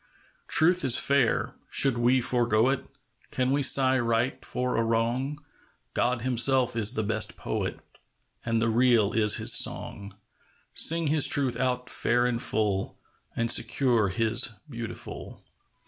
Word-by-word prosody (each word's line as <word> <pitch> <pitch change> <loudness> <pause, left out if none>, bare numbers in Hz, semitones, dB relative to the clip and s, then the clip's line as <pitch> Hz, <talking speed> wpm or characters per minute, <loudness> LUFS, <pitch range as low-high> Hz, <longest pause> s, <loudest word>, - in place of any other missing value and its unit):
Truth 175 +2 +3
is 130 -3 +4
fair; 140 -4 +1 0.2
should 135 -3 +2
we 120 +2 +1
forego 120 -1 +1
it? 135 - -3 0.4
Can 130 0 -2
we 140 +1 0
sigh 130 -1 +3
right 115 +1 -2
for 125 0 -3
a 115 - 0
wrong? 120 +5 -2 0.6
God 120 -1 -1
Himself 130 0 +1
is 115 +1 +2
the 110 - -1
best 110 0 -2
Poet, - - -4 0.6
And 115 -1 -1
the 115 - 0
Real 115 -2 +2
is 105 -2 +3
His - - +3
song. 100 -1 0 0.6
Sing 165 +1 +3
His 150 -1 +3
Truth 135 -4 0
out 125 -1 -2
fair 120 +1 0
and 120 -1 -2
full, 105 -3 -2 0.4
And 115 0 0
secure 120 -7 +1
His 115 +3 0
beautiful. 120 -5 -9
120 Hz, 140 wpm, -26 LUFS, 115-130 Hz, 0.6 s, is